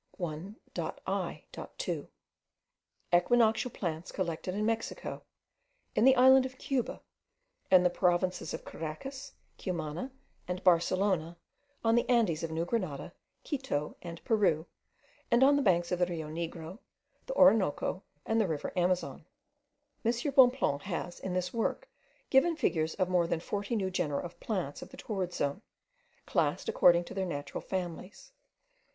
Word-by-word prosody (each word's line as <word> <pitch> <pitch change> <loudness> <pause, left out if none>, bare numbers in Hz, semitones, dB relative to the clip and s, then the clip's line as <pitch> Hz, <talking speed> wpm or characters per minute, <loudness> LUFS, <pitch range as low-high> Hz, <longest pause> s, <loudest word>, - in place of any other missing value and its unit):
1.I.2. 185 - -5 1.1
EQUINOCTIAL 225 +6 +4
PLANTS 170 -3 -4
COLLECTED 180 0 -3
IN 210 +1 0
MEXICO, 225 0 -2 0.7
IN 220 - +3
THE 265 0 +7
ISLAND 260 +1 +7
OF 260 0 -15
CUBA, 260 -3 -2 0.7
IN 185 -1 +7
THE 180 - +4
PROVINCES 180 -1 +1
OF - - -10
CARACAS, 265 - -7 0.3
CUMANA, 170 - -4 0.4
AND 180 +1 -4
BARCELONA, 175 -1 +2 0.5
ON 225 0 +3
THE 240 +2 +2
ANDES 220 -10 +3
OF 165 - -3
NEW 160 +1 -1
GRENADA, 180 -10 -3 0.3
QUITO, 265 - -2
AND 170 -1 -8
PERU, 190 -9 +2 0.6
AND 240 0 +5
ON 280 +2 +6
THE 285 - +2
BANKS 175 -7 +2
OF 180 - 0
THE 180 - +3
RIO 160 -3 -4
NEGRO, 165 +3 -5 0.5
THE - - -3
ORINOCO, 200 - +4 0.2
AND 225 0 +2
THE 210 - +1
RIVER 155 -3 -3
AMAZON. 180 -6 0 0.8
M. 230 - +3 0.2
Bonpland 250 - +5
has 175 -1 -4
in 185 -1 -4
this 180 0 -1
work 235 - -1 0.4
given 325 +6 +5
figures 160 - 0
of 185 -2 +1
more 180 -2 +2
than 165 - 0
forty 205 +6 -3
new 190 -3 -1
genera 155 -6 -1
of 175 -1 -9
plants 180 -10 -3
of - - -9
the - - -13
torrid 190 -5 -3
zone, 145 +2 -2 0.6
classed 160 +2 0
according 175 0 +5
to - - -9
their 190 -1 -2
natural 145 -4 -4
families. 185 - -5
185 Hz, 140 wpm, -31 LUFS, 170-225 Hz, 1.1 s, THE